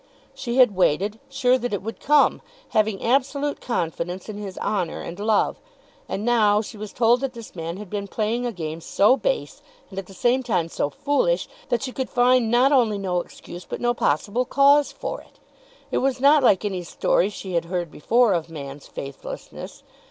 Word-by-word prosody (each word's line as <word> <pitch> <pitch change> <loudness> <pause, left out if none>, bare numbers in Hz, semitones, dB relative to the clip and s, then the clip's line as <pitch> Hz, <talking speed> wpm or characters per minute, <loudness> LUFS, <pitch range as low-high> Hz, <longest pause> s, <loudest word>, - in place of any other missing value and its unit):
She 240 -2 -4
had 245 -6 +6
waited, 195 +5 +1
sure 260 -2 +2
that 245 -3 -2
it 195 - -6
would 225 +2 -6
come, 295 0 +3 0.3
having 215 -3 +1
absolute 280 +3 0
confidence 175 -4 -3
in 215 - -5
his 195 -3 -7
honour 185 -6 -2
and 175 - -7
love. 215 0 +1 0.5
And 205 - -3
now 215 -4 +4
she 220 - -6
was 210 0 -7
told 240 +1 +3
that 270 -2 -2
this 230 -5 -11
man 165 +1 -5
had 210 0 -8
been 200 +1 -4
playing 220 +4 -1
a 245 - -1
game 165 -4 -5
so 205 +9 +4
base, - - -2 0.3
and 190 - -5
at 190 - -8
the 195 - -13
same 245 +5 +2
time 185 -10 -1
so 145 - -1
foolish, 290 - 0 0.2
that 240 +2 0
she 260 - -3
could 260 0 -4
find 245 -1 +3
not 245 +4 +4
only 235 -7 +3
no 185 -3 -1
excuse 175 +1 -11
but - - -6
no 240 0 +1
possible 205 +5 0
cause 280 +3 +4
for - - -5
it. - - -23 0.5
It - - +1
was 265 0 0
not 285 +3 +6
like 210 -5 +4
any 190 -3 -2
story 175 +2 +1
she 190 -2 -7
had 170 -1 0
heard 175 -2 -3
before 230 +7 +3
of 165 -2 -2
man's 140 -3 -8
faithlessness. 140 0 -8
215 Hz, 195 wpm, -23 LUFS, 185-250 Hz, 0.5 s, had